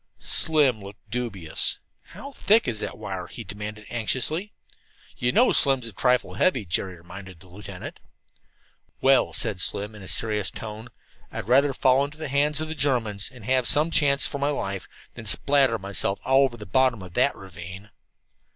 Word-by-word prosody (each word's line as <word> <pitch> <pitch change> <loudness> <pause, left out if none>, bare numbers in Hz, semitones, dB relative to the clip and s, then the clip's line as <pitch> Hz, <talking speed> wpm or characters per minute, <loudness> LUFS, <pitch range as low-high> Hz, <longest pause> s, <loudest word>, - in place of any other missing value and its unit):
Slim 145 -8 +2
looked 100 +2 -13
dubious. 110 -9 -3 0.3
"How 280 - -11
thick 220 - +2
is 115 -3 -1
that - - -4
wire?" - - -6
he - - -9
demanded 105 +1 -8
anxiously. 130 - -2 0.6
"You 125 0 0
know 245 - +4
Slim's 135 -4 +4
a 115 - -5
trifle 125 +5 +1
heavy," 130 - +1
Jerry 90 +1 -1
reminded 90 +1 -12
the 95 - -15
lieutenant. 95 +3 -9 1.0
"Well," 135 0 +3
said 95 -3 +1
Slim 105 +2 0
in 105 - -12
a 95 - -11
serious 105 -1 +2
tone, 110 +2 -9 0.4
"I'd - - -6
rather 135 +4 +4
fall 130 0 +2
into 145 +1 -7
the 155 -2 -6
hands 145 +2 +1
of 155 - -3
the 160 - -5
Germans, 120 -9 -1
and 120 -5 -14
have 130 0 +1
some 155 +4 +5
chance 145 -3 +4
for 140 - -2
my 140 +1 0
life, 100 -10 -4 0.3
than 110 - -10
spatter 135 +2 +4
myself 100 0 -2
all 135 +1 +4
over 120 -3 -5
the 105 - -10
bottom 120 0 +1
of 90 -2 -12
that 130 +6 +2
ravine." 95 +3 -11
120 Hz, 175 wpm, -24 LUFS, 100-140 Hz, 1.0 s, some